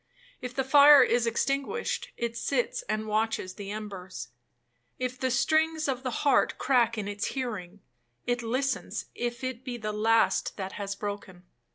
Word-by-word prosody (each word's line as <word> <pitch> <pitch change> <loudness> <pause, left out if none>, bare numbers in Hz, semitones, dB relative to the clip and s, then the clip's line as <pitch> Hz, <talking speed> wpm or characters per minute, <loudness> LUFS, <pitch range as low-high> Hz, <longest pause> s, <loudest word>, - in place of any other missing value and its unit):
If 250 0 -6
the 265 - +1
fire 285 +1 +8
is 240 -1 +2
extinguished, 275 - -1
it 235 -1 -2
sits - - -1
and 215 0 -1
watches 215 -3 -1
the 200 +1 -8
embers. 195 - -7 0.7
If 255 0 -3
the 260 - 0
strings 315 +5 +2
of 260 -2 -1
the 260 - -2 0.2
heart 280 - +3
crack 235 -4 +2
in 205 -2 -3
its 205 0 -3
hearing, 205 -7 -4 0.4
it 245 0 0
listens 255 +4 -2
if 240 +1 -4
it 255 -1 -4
be 250 -2 -5
the 215 -2 -4
last 225 +2 +2
that 190 -1 -4
has 200 -1 -4
broken. 200 -3 -6
235 Hz, 160 wpm, -28 LUFS, 210-260 Hz, 0.7 s, fire